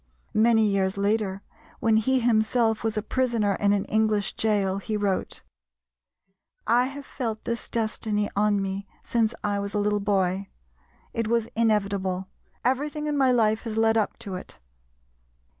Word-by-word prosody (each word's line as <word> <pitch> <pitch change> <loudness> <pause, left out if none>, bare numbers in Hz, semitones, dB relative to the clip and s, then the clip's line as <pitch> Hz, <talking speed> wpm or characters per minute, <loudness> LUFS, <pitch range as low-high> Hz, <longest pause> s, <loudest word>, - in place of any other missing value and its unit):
Many 220 0 +4
years 195 -2 +1
later, 200 -1 0 0.4
when 225 -1 +3
he 260 +4 +2
himself 225 -1 +2
was 220 -1 -1
a 215 - -1
prisoner 230 -4 +1
in 200 -1 +3
an 200 -1 +1
English 215 -2 +1
gaol 200 -3 +1
he 215 +2 -3
wrote: 200 -2 -2 1.2
"I 240 +2 +4
have 275 +1 -7
felt 225 -5 -4
this 235 0 -3
destiny 215 -2 -1
on 205 0 +2
me 195 +1 -3 0.2
since 225 -1 +1
I 205 -1 0
was 200 +1 -4
a - - +2
little 210 0 +1
boy; 195 -1 0 0.6
it 230 -1 -1
was 230 0 +1
inevitable; 200 -4 0 0.4
everything 295 +4 0
in 300 -1 -1
my 265 -2 +4
life 220 -3 +2
has 225 -2 -4
led 225 0 +3
up 220 -2 0
to 195 - -5
it." 180 - -8
215 Hz, 155 wpm, -26 LUFS, 200-230 Hz, 1.2 s, Many